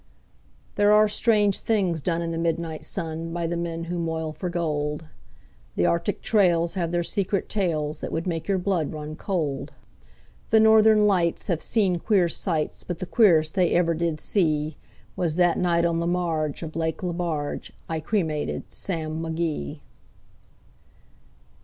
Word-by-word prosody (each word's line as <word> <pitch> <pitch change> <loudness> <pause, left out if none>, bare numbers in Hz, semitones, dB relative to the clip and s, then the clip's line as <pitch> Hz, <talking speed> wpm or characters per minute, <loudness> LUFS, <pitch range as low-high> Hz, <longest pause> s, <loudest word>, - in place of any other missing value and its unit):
There 205 0 +5
are 215 0 +6
strange 210 -2 +2
things 190 -8 0
done 170 +3 -1
in 165 - -3
the 165 - -3
midnight 165 -1 -2
sun 165 0 -4
By 170 0 -2
the 170 +1 -2
men 170 -1 -3
who 175 +1 -3
moil 160 -1 -2
for 170 +4 -4
gold; 150 -3 -2 0.7
The 85 - +2
Arctic 170 +4 0
trails 175 -6 +3
have 170 -3 -2
their 175 0 0
secret 195 +2 -1
tales 155 -7 -1
That - - -4
would 165 +1 -2
make 165 -3 -3
your 195 - +2
blood 180 -5 -1
run 155 0 -6
cold; 150 -6 -3 0.8
The 220 - +5
Northern 220 -1 +6
Lights 180 -5 +1
have 170 -3 0
seen 190 -6 +1
queer 190 -3 +2
sights, 165 -3 -1
But 175 - -5
the 185 - -4
queerest 170 -6 +4
they 180 -3 +2
ever 170 -1 +3
did 165 -1 -1
see 155 -6 0 0.4
Was 165 -3 -1
that 175 -1 +3
night 170 -1 +2
on 165 -1 +1
the 170 - -1
marge 165 -4 -1
of 160 -1 -7
Lake 160 +2 -2
Lebarge 170 -4 -3 0.2
I 160 -1 -2
cremated 155 -3 -2
Sam 160 -4 -3
McGee. 160 - -3
170 Hz, 160 wpm, -25 LUFS, 160-185 Hz, 0.8 s, are